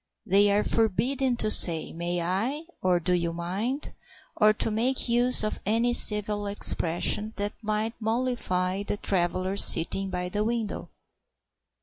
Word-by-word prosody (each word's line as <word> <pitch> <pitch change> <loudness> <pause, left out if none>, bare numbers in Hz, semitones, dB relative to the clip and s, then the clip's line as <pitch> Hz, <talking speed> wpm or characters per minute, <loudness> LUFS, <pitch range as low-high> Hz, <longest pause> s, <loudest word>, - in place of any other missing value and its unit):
They 200 0 +3
are 205 +1 +2
forbidden 245 +4 0
to 215 -2 0
say 165 -6 +3
"May 175 +1 -3
I?" 225 - -2 0.2
or 180 -1 +1
"Do 180 +2 -1
you 170 -1 -1
mind?" 200 - -4 0.4
or 215 -1 +4
to 215 +1 -1
make 245 +5 -1
use 245 0 +4
of 215 - -3
any 230 +4 0
civil 210 -2 +3
expression 200 +2 0
that 205 +1 -3
might 215 +1 -2
mollify 220 -5 -2
the 205 0 -4
traveller 185 0 -1
sitting 195 +2 +3
by 180 -1 -4
the 210 +3 -2
window. 230 -2 -4
210 Hz, 140 wpm, -26 LUFS, 185-230 Hz, 0.4 s, or